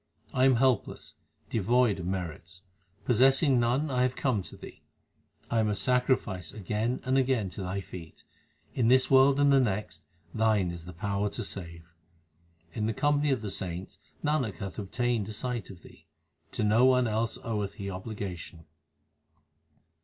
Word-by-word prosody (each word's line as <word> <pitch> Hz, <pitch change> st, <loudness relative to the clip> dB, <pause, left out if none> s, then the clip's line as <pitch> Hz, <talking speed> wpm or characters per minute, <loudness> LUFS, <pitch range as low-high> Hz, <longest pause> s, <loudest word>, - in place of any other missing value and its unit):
1 130 Hz, -, +1 dB
am 135 Hz, -1 st, +5 dB
helpless, 125 Hz, -2 st, 0 dB, 0.4 s
devoid 115 Hz, 0 st, +2 dB
of 85 Hz, -, -5 dB
merits; 90 Hz, 0 st, -5 dB, 0.4 s
possessing 135 Hz, +3 st, +4 dB
none 130 Hz, +6 st, +1 dB
I 125 Hz, -1 st, +1 dB
have 125 Hz, 0 st, +1 dB
come 125 Hz, -7 st, 0 dB
to -, -, -11 dB
Thee. -, -, -12 dB, 0.7 s
I 115 Hz, -, +2 dB
am 110 Hz, -1 st, +2 dB
a 105 Hz, -, 0 dB
sacrifice 125 Hz, -6 st, 0 dB
again 110 Hz, +4 st, -2 dB
and 130 Hz, +1 st, +2 dB
again 125 Hz, -7 st, 0 dB
to 90 Hz, -, -7 dB
Thy 95 Hz, +1 st, -3 dB
feet; 85 Hz, -4 st, -11 dB, 0.5 s
in 120 Hz, -3 st, +1 dB
this 130 Hz, +2 st, +4 dB
world 135 Hz, +1 st, +6 dB
and 145 Hz, -1 st, +5 dB
the 135 Hz, -, +6 dB
next 95 Hz, -9 st, -2 dB, 0.3 s
Thine 110 Hz, -5 st, +2 dB
is 85 Hz, -1 st, -8 dB
the 90 Hz, -, -9 dB
power 100 Hz, +3 st, -1 dB
to -, -, -5 dB
save. 85 Hz, -3 st, -8 dB, 0.8 s
In 105 Hz, 0 st, -1 dB
the 110 Hz, -, 0 dB
company 145 Hz, 0 st, +2 dB
of 130 Hz, -5 st, 0 dB
the 105 Hz, -, -3 dB
saints 90 Hz, 0 st, -4 dB, 0.2 s
Nanak 145 Hz, -, 0 dB
hath 95 Hz, -2 st, -6 dB
obtained 115 Hz, +1 st, -1 dB
a -, -, -5 dB
sight 120 Hz, 0 st, -4 dB
of 90 Hz, -3 st, -12 dB
Thee; -, -, -17 dB, 0.5 s
to -, -, -1 dB
none 125 Hz, +4 st, +4 dB
else 110 Hz, 0 st, -1 dB
oweth 105 Hz, -3 st, -2 dB
he 100 Hz, -, -6 dB
obligation. 90 Hz, -4 st, -7 dB
110 Hz, 160 wpm, -29 LUFS, 95-125 Hz, 0.8 s, world